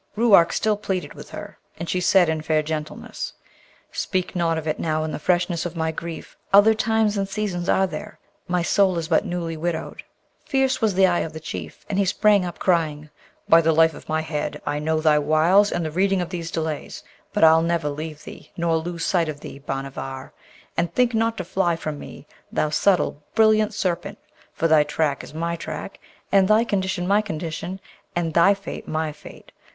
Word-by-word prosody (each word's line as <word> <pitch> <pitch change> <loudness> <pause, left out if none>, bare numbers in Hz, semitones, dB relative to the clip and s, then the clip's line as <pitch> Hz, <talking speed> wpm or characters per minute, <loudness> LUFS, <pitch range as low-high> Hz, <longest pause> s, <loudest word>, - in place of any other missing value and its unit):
Ruark 205 -7 +5
still 215 -1 +1
pleaded 185 -7 -3
with - - -11
her, - - -9 0.2
and 170 - -5
she 180 - -1
said 180 0 +5
in 160 -1 -1
fair 155 0 +1
gentleness, 155 0 -5 0.6
'Speak 185 -2 -2
not 165 -2 +1
of 160 0 -5
it 155 - -1
now 155 -1 0
in 155 - -3
the - - -4
freshness 175 +1 +1
of 175 0 -5
my 160 -1 -1
grief! 165 0 -7 0.2
Other 205 +3 +7
times 220 -1 +1
and 195 -1 -1
seasons 195 -3 -3
are 190 - +4
there. 190 - -7 0.3
My 180 -1 0
soul 190 0 +3
is 165 -1 -2
but 170 +5 +3
newly 175 -3 -3
widowed!' 165 0 -4 0.4
Fierce 265 -1 +1
was 215 -4 +2
the 190 0 +6
eye 175 -2 +2
of 160 - -3
the 160 - -6
Chief, 90 - -8
and 200 -1 -1
he 200 - +3
sprang 205 +1 +3
up, 175 -1 -5
crying, 155 -4 0 0.4
'By 165 0 +7
the 160 0 +2
life 160 0 +4
of - - -13
my 155 0 +1
head, 150 -2 -3
I 145 0 -1
know 155 +1 0
thy 155 -1 +4
wiles 160 +7 +4
and 175 -1 -1
the 155 - -3
reading 190 +3 +2
of 175 -1 -2
these 170 -2 -4
delays: 160 -2 -4 0.3
but - - 0
I'll 160 0 +7
never 170 -2 0
leave 155 +1 -5
thee, - - -12
nor 170 -1 +1
lose 170 +1 -4
sight 170 -4 +1
of 150 -1 -6
thee, 140 - -9
Bhanavar! 135 -1 -6 0.4
And 175 - 0
think 250 -1 +2
not 225 0 +1
to 185 - -3
fly 175 -1 0
from 155 -3 -5
me, - - -10 0.3
thou 155 - 0
subtle, 175 -2 +2
brilliant 215 -1 +4
Serpent! 175 -3 -2 0.3
for 165 - 0
thy 155 -1 +5
track 150 -1 -1
is - - -12
my 170 +1 -2
track, 160 +3 -7 0.3
and 195 -1 +5
thy 215 +2 +5
condition 190 -4 -1
my 205 +2 +4
condition, 170 -1 -5 0.4
and 165 -2 -1
thy 190 +5 +5
fate 200 +1 -8
my 155 0 -1
fate. 150 - -14
170 Hz, 200 wpm, -23 LUFS, 155-195 Hz, 0.6 s, Other